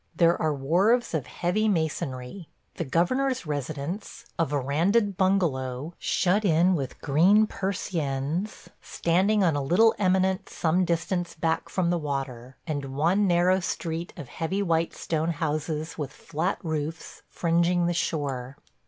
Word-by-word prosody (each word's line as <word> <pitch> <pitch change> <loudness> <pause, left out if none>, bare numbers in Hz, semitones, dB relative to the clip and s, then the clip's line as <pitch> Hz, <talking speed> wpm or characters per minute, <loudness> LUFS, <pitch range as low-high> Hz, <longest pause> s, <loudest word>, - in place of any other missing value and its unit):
There 170 0 +4
are 155 - +2
wharves 180 - +2
of 155 -5 -2
heavy 180 +5 0
masonry; 160 -3 -2 0.3
the - - -1
governor's 240 - 0
residence, 150 - -5
a 165 - +2
verandaed 165 - +1
bungalow 160 -7 0
shut 195 +4 +1
in 175 0 +4
with 140 -7 -3
green 185 +10 +4
persiennes, 175 -3 -3
standing 195 +5 +1
on 165 -5 +3
a 145 - 0
little 185 +11 +4
eminence 190 -1 +1
some 175 +3 +2
distance 170 0 -1
back 165 0 -1
from 175 -2 0
the 175 - +1
water; 135 -4 -5
and 140 -4 -4
one 185 +7 +3
narrow 180 +1 +3
street 170 -1 -3
of 145 -6 -7
heavy 175 +9 -2
white 165 -2 0
stone 160 0 -1
houses 155 +1 -3
with 145 -3 -3
flat 170 +6 -3
roofs, 160 0 -4
fringing 170 +1 +1
the 175 - +1
shore. 140 -6 -2
165 Hz, 135 wpm, -26 LUFS, 150-185 Hz, 0.3 s, There